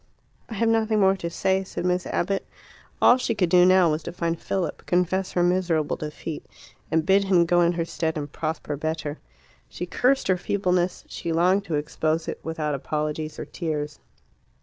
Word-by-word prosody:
"I 225 Hz, -, -6 dB
have 230 Hz, +3 st, +1 dB
nothing 220 Hz, -1 st, +2 dB
more 195 Hz, -1 st, +4 dB
to 170 Hz, -2 st, -4 dB
say," 190 Hz, +3 st, 0 dB
said 185 Hz, -, -5 dB
Miss 180 Hz, 0 st, 0 dB
Abbott. 195 Hz, +2 st, -1 dB, 0.6 s
All 245 Hz, -, +7 dB
she 250 Hz, -3 st, -1 dB
could 185 Hz, -5 st, +1 dB
do 180 Hz, 0 st, +7 dB
now 185 Hz, -3 st, +5 dB
was 155 Hz, +1 st, -1 dB
to -, -, -6 dB
find 170 Hz, -1 st, -2 dB
Philip, 185 Hz, -5 st, -3 dB
confess 180 Hz, +2 st, +1 dB
her 175 Hz, -, +2 dB
miserable 175 Hz, -4 st, +1 dB
defeat, 150 Hz, +1 st, -6 dB, 0.5 s
and 160 Hz, 0 st, +1 dB
bid 195 Hz, +2 st, +4 dB
him 180 Hz, -3 st, +4 dB
go 175 Hz, +1 st, +3 dB
in 170 Hz, 0 st, +3 dB
her 170 Hz, -1 st, -1 dB
stead 160 Hz, -1 st, -2 dB
and 145 Hz, -1 st, -5 dB
prosper 155 Hz, -1 st, -3 dB
better. 155 Hz, 0 st, -3 dB, 0.5 s
She 175 Hz, -, -5 dB
cursed 260 Hz, +9 st, +1 dB
her 185 Hz, -1 st, +3 dB
feebleness; 180 Hz, -1 st, 0 dB
she 170 Hz, -, -5 dB
longed 180 Hz, +4 st, +3 dB
to 165 Hz, -, -2 dB
expose 155 Hz, +2 st, -1 dB
it, -, -, -4 dB
without 155 Hz, -2 st, -3 dB
apologies 150 Hz, +2 st, -3 dB
or -, -, -5 dB
tears. 150 Hz, -3 st, -4 dB
175 Hz, 185 wpm, -25 LUFS, 155-190 Hz, 0.6 s, All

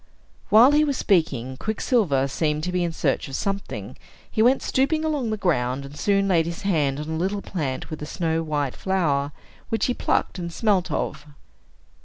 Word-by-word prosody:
While 235 Hz, +6 st, +7 dB
he 300 Hz, +1 st, +4 dB
was 285 Hz, -3 st, 0 dB
speaking, 130 Hz, -, +1 dB
Quicksilver 205 Hz, -, +1 dB
seemed 150 Hz, +2 st, -1 dB
to 180 Hz, -, -2 dB
be 180 Hz, -1 st, 0 dB
in 170 Hz, -, -1 dB
search 150 Hz, -4 st, -1 dB
of 135 Hz, -, -6 dB
something; 195 Hz, 0 st, -4 dB, 0.4 s
he 220 Hz, -, +1 dB
went 250 Hz, +4 st, +4 dB
stooping 310 Hz, +4 st, +1 dB
along 290 Hz, -7 st, -1 dB
the 215 Hz, -, -1 dB
ground, 135 Hz, -8 st, 0 dB
and 140 Hz, +1 st, -11 dB
soon 195 Hz, +3 st, +1 dB
laid 170 Hz, -4 st, +3 dB
his 170 Hz, +2 st, -5 dB
hand 150 Hz, -8 st, +1 dB
on 150 Hz, -, -5 dB
a 160 Hz, -, -3 dB
little 195 Hz, +4 st, -1 dB
plant 145 Hz, -8 st, -4 dB
with 155 Hz, -, -6 dB
a 150 Hz, -, -5 dB
snow 165 Hz, -1 st, -1 dB
white 150 Hz, -4 st, -2 dB
flower, 150 Hz, -7 st, 0 dB, 0.4 s
which 225 Hz, -2 st, +1 dB
he 250 Hz, -, +1 dB
plucked 195 Hz, -, -1 dB
and 170 Hz, -1 st, -4 dB
smelt 195 Hz, -1 st, +1 dB
of. 150 Hz, -, -3 dB
175 Hz, 190 wpm, -24 LUFS, 150-210 Hz, 0.4 s, While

